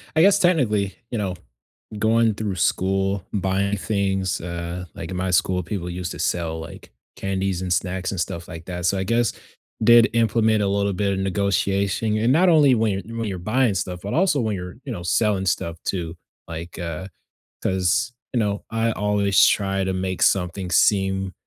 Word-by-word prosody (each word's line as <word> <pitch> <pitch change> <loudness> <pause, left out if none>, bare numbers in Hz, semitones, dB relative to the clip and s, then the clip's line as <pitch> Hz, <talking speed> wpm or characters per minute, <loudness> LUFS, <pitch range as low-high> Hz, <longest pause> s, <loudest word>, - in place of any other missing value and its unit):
I 160 - +5
guess, 200 +3 +6
technically, 110 - +2
you 120 - -3
know, 95 -3 -2 0.6
going 110 0 +3
through 105 -2 -3
school, 95 +1 0
buying 100 0 0
things, 95 0 -1
uh, 85 +1 -5
like, 80 - -7
in 95 - -4
my 95 0 -1
school, 90 0 +2
people 90 0 -4
used 90 0 -4
to - - -9
sell, 80 -2 -1
like, 80 - -10 0.3
candies 95 -1 -2
and 90 -1 -2
snacks 95 +1 -1
and 95 - -2
stuff 85 +1 -4
like 85 -2 -8
that, 90 -1 -3
so 95 - +2
I 95 - -1
guess, 115 +2 +1 0.5
did 120 +1 +7
implement 110 -1 +2
a 100 - +1
little 100 0 +1
bit 100 +1 0
of 95 - -1
negotiation 100 +2 0
and 115 +4 +3
not 180 +6 +4
only 150 -6 +6
when 110 -2 +1
you're 100 +4 -5
when 115 -1 -2
you're 95 -2 -4
buying 110 +4 +1
stuff, 90 -1 -3
but 100 - -4
also 170 -4 +2
when 110 -3 -1
you're, 90 -1 -7
you 140 - -6
know, 95 -7 -5
selling 95 +1 +1
stuff 85 -2 -1
too. 85 -3 -3 0.3
Like, 85 +2 -7
uh, 85 +1 -4 0.6
'cause, 95 +6 +1 0.2
you 125 - 0
know, 105 -2 -1
I 115 0 0
always 105 -2 +2
try 95 -1 +1
to 95 0 -1
make 95 0 -3
something 90 0 +1
seem 95 +1 +2
95 Hz, 185 wpm, -23 LUFS, 90-110 Hz, 0.6 s, did